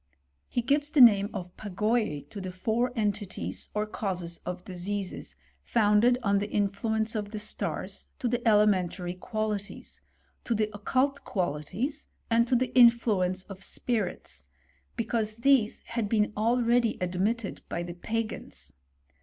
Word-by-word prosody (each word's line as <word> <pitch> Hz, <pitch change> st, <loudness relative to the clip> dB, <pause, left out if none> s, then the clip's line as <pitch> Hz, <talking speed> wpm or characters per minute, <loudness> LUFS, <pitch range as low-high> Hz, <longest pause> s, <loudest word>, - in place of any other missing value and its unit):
He 240 Hz, -, -1 dB
gives 285 Hz, +4 st, +2 dB
the 300 Hz, -, +1 dB
name 205 Hz, -5 st, +8 dB
o^pagoyce 205 Hz, -2 st, -2 dB
to 200 Hz, -, -6 dB
the 185 Hz, -1 st, -5 dB
four 225 Hz, +7 st, 0 dB
entities, 205 Hz, -3 st, -2 dB
or 210 Hz, 0 st, +1 dB
causes 180 Hz, -5 st, -3 dB
of 180 Hz, 0 st, -5 dB
diseases, 190 Hz, +1 st, -4 dB, 0.3 s
founded 225 Hz, +2 st, +3 dB
on 200 Hz, -2 st, +3 dB
the 205 Hz, +1 st, -3 dB
influence 215 Hz, +2 st, 0 dB
of 210 Hz, -2 st, -3 dB
the 215 Hz, -, -6 dB
stars, 210 Hz, 0 st, -3 dB
to 245 Hz, -, -2 dB
the 240 Hz, +1 st, 0 dB
elementary 190 Hz, -4 st, +3 dB
qualities; 210 Hz, +1 st, -4 dB, 0.4 s
to 235 Hz, -, 0 dB
the 215 Hz, 0 st, 0 dB
occult 260 Hz, +7 st, 0 dB
qualities, 195 Hz, -, -2 dB, 0.2 s
and 235 Hz, +1 st, +4 dB
to 250 Hz, -, +2 dB
the 255 Hz, +1 st, 0 dB
influence 220 Hz, -7 st, +4 dB
of 195 Hz, -1 st, -11 dB
spirits; 200 Hz, -, -3 dB, 0.5 s
because 220 Hz, -1 st, -1 dB
these 235 Hz, -2 st, +3 dB
had 230 Hz, -3 st, -3 dB
been 210 Hz, -1 st, +2 dB
already 235 Hz, +1 st, +2 dB
admitted 195 Hz, +5 st, -1 dB
by 170 Hz, -, -2 dB
the 175 Hz, 0 st, -6 dB
Pagans. 220 Hz, +5 st, -5 dB
215 Hz, 135 wpm, -28 LUFS, 195-235 Hz, 0.5 s, name